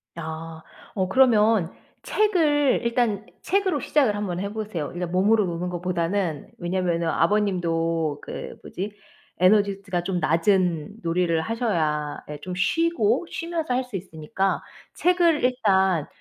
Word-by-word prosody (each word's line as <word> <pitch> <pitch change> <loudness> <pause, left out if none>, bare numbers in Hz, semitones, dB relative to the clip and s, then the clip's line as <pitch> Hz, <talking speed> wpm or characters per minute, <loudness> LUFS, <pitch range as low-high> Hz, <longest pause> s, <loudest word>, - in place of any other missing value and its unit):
아. 160 0 -7 0.3
어 190 -2 0
그러면 220 -5 +4 0.3
책을 310 -10 +2
일단 235 -3 0 0.2
책으로 380 -5 +1
시작을 275 -10 +2
한번 195 -4 -3
해 200 +1 -3
보세요 210 -9 -4
일단 175 -1 -4
몸으로 205 +4 +3
노는 175 0 -3
것보다는. 175 -2 -2
왜냐면은 175 -1 -1
아버님도 165 -5 +1
그 - - -7
뭐지 200 +3 -5 0.5
에너지 200 +1 +3
즈 200 -1 -19
가 175 -1 0
좀 180 0 -1
낮은 170 +2 +1
놀이를 165 -1 +1
하셔야 160 -9 -1
예 150 -1 -6
좀 180 +4 -6
쉬고 325 - +1
쉬면서 335 -5 -3
할 255 +1 +1
수 250 -4 -9
있으니까 185 +1 -2 0.3
책을 345 -4 +3
일단 190 - +2
190 Hz, 275 characters per minute, -24 LUFS, 170-230 Hz, 0.5 s, 그러면